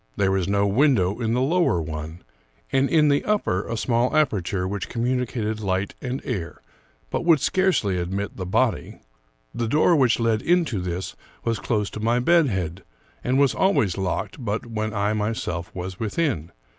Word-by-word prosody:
There 95 -1 +2
was 95 -2 0
no 100 0 +2
window 105 -3 +2
in 115 -1 0
the 125 - +1
lower 165 - +2
one, 80 +1 -6 0.5
and 135 +1 +2
in 155 -2 +4
the 140 0 +2
upper 200 - 0
a 115 - -2
small 120 +4 +1
aperture 100 - 0
which 100 0 -4
communicated 120 -3 -1
light 95 -1 -1
and 130 +1 -4
air, 95 - -4 0.5
but - - -1
would 165 -3 +5
scarcely 140 - +1
admit 95 +4 -3
the 95 -2 -5
body. - - 0 0.5
The 115 - -2
door 155 +7 +4
which 130 -6 +3
led 115 -1 +1
into 165 - +1
this 90 +1 -4 0.3
was 115 -1 -1
close 105 -3 -1
to - - -6
my 115 +3 +1
bed 165 +4 +4
head, 95 -4 -3 0.4
and 130 +2 +1
was 140 -1 +4
always 150 - +2
locked 95 - -3
but 105 +1 -2
when 110 -2 -3
I 105 0 0
myself 105 -5 -2
was 95 +1 -6
within. 110 - -1
110 Hz, 170 wpm, -24 LUFS, 95-130 Hz, 0.5 s, would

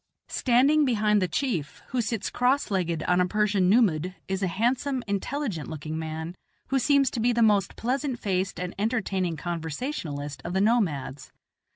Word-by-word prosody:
Standing 275 +5 +3
behind 210 -5 +2
the 185 - +2
chief, 175 - -2
who 250 -1 0
sits 225 -2 -2
cross 250 0 +1
legged 170 -4 0
on 180 0 +2
a 180 - +2
Persian 205 -2 +2
nummud, 185 -5 +3
is 190 0 -2
a 190 - +1
handsome, 250 +7 0
intelligent 205 - -3
looking 155 0 -5
man, 160 +1 -5 0.4
who 270 - +2
seems 275 +1 +3
to - - -3
be 240 +2 +3
the 235 -1 +3
most 205 -3 +3
pleasant 260 +2 -1
faced 190 -3 -1
and 180 0 -4
entertaining 195 -6 -1
conversationalist 160 - -4
of 175 - -4
the 190 - +2
nomads. 160 - 0
200 Hz, 165 wpm, -26 LUFS, 170-245 Hz, 0.4 s, Standing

